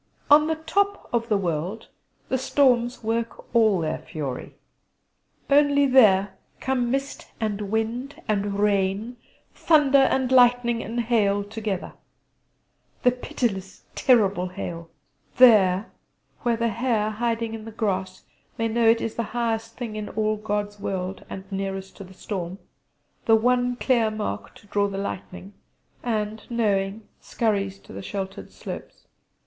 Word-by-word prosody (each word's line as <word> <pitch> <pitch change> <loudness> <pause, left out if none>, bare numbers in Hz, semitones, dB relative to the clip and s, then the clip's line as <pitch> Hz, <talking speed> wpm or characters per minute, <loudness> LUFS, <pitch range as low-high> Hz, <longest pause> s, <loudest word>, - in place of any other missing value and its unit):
On 300 +1 +7
the 320 - +1
top 400 +6 -1
of 235 0 0
the 210 - +3
world 180 +4 -3 0.4
the 260 - 0
storms 250 -3 +2
work 230 +2 -3
all 215 -5 +4
their 155 - -2
fury. 140 -5 -6 0.9
Only 285 0 +4
there 200 -7 +4 0.2
come 250 -2 0
mist 275 +2 -3
and 210 -2 -2
wind 230 +6 -2
and 205 -1 0
rain, 205 +3 0 0.4
thunder 290 -4 +4
and 265 -1 +2
lightning 245 -2 +4
and 235 +2 -2
hail 205 -4 +2
together 205 -2 -4 1.1
the 250 - +6
pitiless 210 -6 -3
terrible 200 -8 +3
hail: 170 -3 -6 0.5
there, 210 -5 +6 0.5
where 240 -3 +1
the 230 0 +1
hare 225 -2 0
hiding 230 0 -2
in 220 -1 -7
the 225 - -7
grass 190 -4 -2 0.3
may 225 - 0
know 225 0 +3
it 230 0 +4
is 225 - -2
the - - -2 0.2
highest 225 -1 -2
thing 235 -4 -5
in 210 -1 -5
all 215 0 0
God's 205 -1 -3
world, 190 -1 -4
and 190 - -6
nearest 195 0 -4
to - - -8
the 190 0 -14
storm 185 -2 -5 0.7
the 225 - +6
one 245 +2 +2
clear 240 -3 +2
mark 215 - -5
to - - -17
draw 200 0 +1
the 195 -1 -5
lightning 195 0 -6 0.5
and, 215 -2 -3
knowing, 210 -2 0
scurries 200 -4 -1
to - - -15
the - - -6
sheltered 195 0 -6
slopes. - - -9
220 Hz, 140 wpm, -24 LUFS, 195-240 Hz, 1.1 s, On